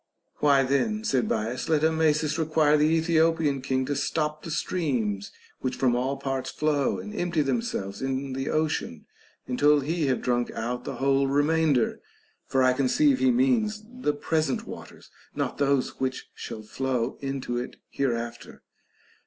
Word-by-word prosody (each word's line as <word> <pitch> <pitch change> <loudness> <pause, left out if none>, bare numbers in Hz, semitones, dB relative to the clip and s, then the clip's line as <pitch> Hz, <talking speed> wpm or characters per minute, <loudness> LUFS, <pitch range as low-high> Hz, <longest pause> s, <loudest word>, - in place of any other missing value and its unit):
Why 140 -2 +4
then, 215 - 0
said 125 - +1
Bias, 115 +5 -2
let 155 -1 +2
Amasis 160 -1 +2
require 155 -1 +3
the 150 0 +4
Ethiopian 160 -3 +2
king 130 0 0
to 145 - -2
stop 150 +2 -1
the - - -8
streams 120 - -1 0.3
which 130 -1 -2
from 125 -2 +2
all 130 +3 -1
parts 135 -1 -3
flow 150 -2 0
and 210 - -7
empty 175 -6 0
themselves 135 - -2
in 135 0 -2
the 135 +1 -3
ocean, 155 0 -1 0.4
until 145 +3 +3
he 155 +2 -1
have 130 - 0
drunk 120 -1 +1
out 120 +2 -3
the 140 - -4
whole 135 +2 +2
remainder; 145 -2 +2 0.5
for 135 -1 +2
I 130 0 +5
conceive 260 - +3
he 265 - +4
means 240 -4 +2
the 245 -11 -2
present 155 -1 -1
waters, - - -11 0.2
not - - -2
those 140 -2 +1
which 130 0 -3
shall 110 - -7
flow 125 +2 -2
into 135 -3 -3
it 125 - -6 0.2
here 135 -4 0
after. 115 0 -7
140 Hz, 155 wpm, -26 LUFS, 130-160 Hz, 0.5 s, I